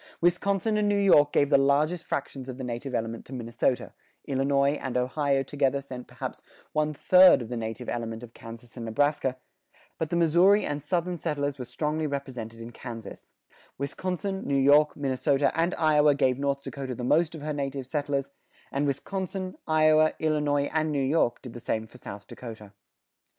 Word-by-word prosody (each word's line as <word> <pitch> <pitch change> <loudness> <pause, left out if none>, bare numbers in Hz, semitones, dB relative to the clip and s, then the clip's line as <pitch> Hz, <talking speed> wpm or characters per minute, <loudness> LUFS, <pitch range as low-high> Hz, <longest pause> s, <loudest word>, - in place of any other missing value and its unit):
Wisconsin 195 +5 +1
and 210 -1 +2
New 205 - +2
York 150 -8 +5
gave 145 - +3
the 140 - +6
largest 150 +5 +2
fractions 135 -1 -4
of 125 - -6
the 130 - -6
native 125 +2 -4
element 115 0 -3
to 135 - -11
Minnesota; 120 +1 -1 0.3
Illinois 140 0 +2
and 130 -2 -2
Ohio 135 +2 +1
together 140 0 0
sent 130 -2 -8
perhaps - - -6 0.3
one 155 0 +1
third 185 +5 +6
of 120 -3 -7
the 125 - -3
native 115 +1 -5
element 115 -1 -4
of 120 -1 -11
Kansas 115 0 -11
and 115 -2 -6
Nebraska, 135 +2 +1 0.6
but 160 - -1
the 170 - -1
Missouri 175 +5 +4
and 145 0 -3
Southern 175 +4 -1
settlers 145 -4 -2
were 125 - -4
strongly 155 +3 -2
represented 125 -5 -5
in 115 +1 -8
Kansas; 115 -1 -9 0.5
Wisconsin, 185 +7 -3
New 140 - 0
York, 145 +2 +5
Minnesota, 135 0 +1
and 170 +2 +1
Iowa 150 -2 +4
gave 130 -2 +1
North 140 0 -1
Dakota 135 -3 -5
the 125 - -6
most 160 +6 +2
of 150 - -8
her 150 0 -2
native 135 -2 -3
settlers; 140 0 -2 0.4
and 140 +1 0
Wisconsin, 185 +6 -3
Iowa, 155 0 +4
Illinois, 150 -2 +1
and 155 -1 +1
New 145 - 0
York 135 -3 +1
did 125 -3 -8
the 120 - -8
same 110 -1 -2
for 125 +3 -15
South 100 -2 -9
Dakota. 110 -4 -10
140 Hz, 175 wpm, -27 LUFS, 125-155 Hz, 0.6 s, the